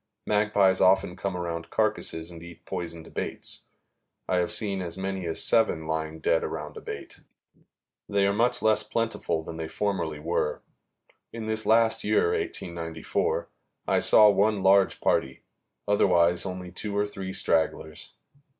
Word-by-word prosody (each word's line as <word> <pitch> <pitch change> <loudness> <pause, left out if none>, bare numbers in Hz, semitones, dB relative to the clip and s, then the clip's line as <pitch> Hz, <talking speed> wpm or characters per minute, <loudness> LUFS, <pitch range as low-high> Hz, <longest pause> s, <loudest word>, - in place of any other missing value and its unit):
Magpies 105 -3 +2
often 95 -1 +3
come 95 -1 -3
around 85 -1 -4
carcasses 80 +1 -1
and 85 -1 -11
eat 85 -1 -13
poisoned 85 -2 -6
baits. - - -3 0.6
I 90 - +1
have 90 -1 0
seen 100 -3 +2
as 85 0 -5
many 95 -2 -3
as 80 - +1
seven 110 -8 +2
lying 80 0 -3
dead 80 - +2
around - - -5
a - - -8
bait. - - -8 0.9
They 100 -1 +2
are 100 - +2
much 120 +3 +1
less 110 -1 +3
plentiful 105 -7 -2
than 80 0 -8
they 80 -1 -4
formerly 95 -6 -2
were. 75 0 -2 0.7
In 115 -1 -6
this 110 0 -1
last 115 0 +4
year, 440 +1 +2
1894, 85 - -2 0.4
I - - +3
saw 105 - +7
one 105 0 +2
large 95 0 +4
party; 65 0 0 0.4
otherwise 90 -3 +3
only 90 -1 -6
two 100 +2 -2
or 105 - +2
three 95 -2 -6
stragglers. 80 -3 -1
95 Hz, 150 wpm, -26 LUFS, 85-105 Hz, 0.9 s, saw